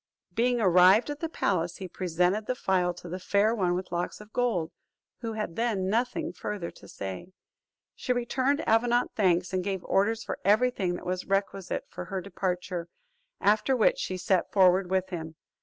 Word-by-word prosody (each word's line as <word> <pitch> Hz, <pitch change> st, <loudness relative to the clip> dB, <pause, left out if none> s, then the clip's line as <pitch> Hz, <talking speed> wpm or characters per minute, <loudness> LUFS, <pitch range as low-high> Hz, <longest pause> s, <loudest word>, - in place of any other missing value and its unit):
Being 240 Hz, +1 st, +2 dB
arrived 190 Hz, +5 st, +5 dB
at 290 Hz, -, -6 dB
the 330 Hz, -, -3 dB
palace, 175 Hz, -, -1 dB
he 190 Hz, -, -6 dB
presented 180 Hz, +4 st, 0 dB
the 255 Hz, -, 0 dB
phial 185 Hz, -5 st, +1 dB
to 175 Hz, -, -10 dB
the 180 Hz, +2 st, -5 dB
Fair 205 Hz, +4 st, +2 dB
One 180 Hz, -6 st, +1 dB
with 185 Hz, 0 st, -5 dB
Locks 175 Hz, 0 st, -3 dB
of 210 Hz, +1 st, -14 dB
Gold, 205 Hz, -10 st, 0 dB, 0.5 s
who 230 Hz, -2 st, -4 dB
had 210 Hz, -6 st, -4 dB
then 215 Hz, -5 st, 0 dB
nothing 250 Hz, +9 st, -1 dB
further 195 Hz, -5 st, -5 dB
to -, -, -16 dB
say. 95 Hz, -, -7 dB, 0.6 s
She 255 Hz, -, -3 dB
returned 260 Hz, +4 st, 0 dB
Avenant 240 Hz, +2 st, +3 dB
thanks, 180 Hz, -3 st, +2 dB
and 185 Hz, -1 st, 0 dB
gave 190 Hz, -1 st, -3 dB
orders 225 Hz, +3 st, +1 dB
for -, -, -5 dB
every 215 Hz, +6 st, +4 dB
thing 180 Hz, -6 st, -1 dB
that -, -, -8 dB
was 185 Hz, 0 st, -2 dB
requisite 195 Hz, -1 st, -1 dB
for -, -, -7 dB
her 195 Hz, -2 st, -3 dB
departure: 180 Hz, -2 st, -3 dB, 0.5 s
after 215 Hz, +6 st, +3 dB
which 230 Hz, -, +3 dB
she 185 Hz, -, -3 dB
set 185 Hz, 0 st, +1 dB
forward 185 Hz, -1 st, +4 dB
with 190 Hz, 0 st, 0 dB
him. 160 Hz, -3 st, -6 dB
195 Hz, 180 wpm, -28 LUFS, 180-225 Hz, 0.6 s, arrived